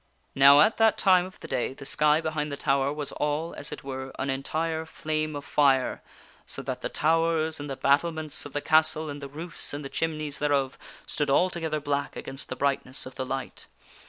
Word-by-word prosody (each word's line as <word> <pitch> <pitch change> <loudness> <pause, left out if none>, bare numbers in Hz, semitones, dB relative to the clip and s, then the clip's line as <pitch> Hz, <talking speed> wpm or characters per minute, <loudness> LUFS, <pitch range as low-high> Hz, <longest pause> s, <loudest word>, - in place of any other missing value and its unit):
Now 140 +2 +8
at 215 - +4
that 225 -1 +4
time 185 -2 +4
of 185 - -15
the - - -8
day 130 0 -2
the 140 - -10
sky 150 +2 +4
behind 155 -2 -2
the 140 - -4
tower 135 0 +1
was 150 -1 -3
all, 150 +3 -2
as 145 - -4
it - - -7
were, 130 -1 -6
an 140 - -1
entire 160 +4 -2
flame 155 -1 -3
of 145 - -6
fire, 135 -3 +2 0.5
so - - -5
that - - -4
the - - -3
towers 160 0 +1
and 145 0 -6
the 135 - -3
bat 140 +2 +4
tlements 160 -3 -2
of 145 - -9
the 145 - -1
castle 155 0 +3
and 145 0 -8
the 140 - -7
roofs 155 0 -3
and 145 0 -6
the - - -5
chimneys 155 -2 -2
thereof 140 -2 +1 0.3
stood 145 -2 -2
alto 175 +5 +2
gether 155 -2 -2
black 140 -1 -2
against 135 +1 -7
the 130 - -3
brightness 135 -1 -1
of 130 - -9
the 130 0 -4
light. 135 +1 -5
150 Hz, 215 wpm, -27 LUFS, 140-160 Hz, 0.5 s, Now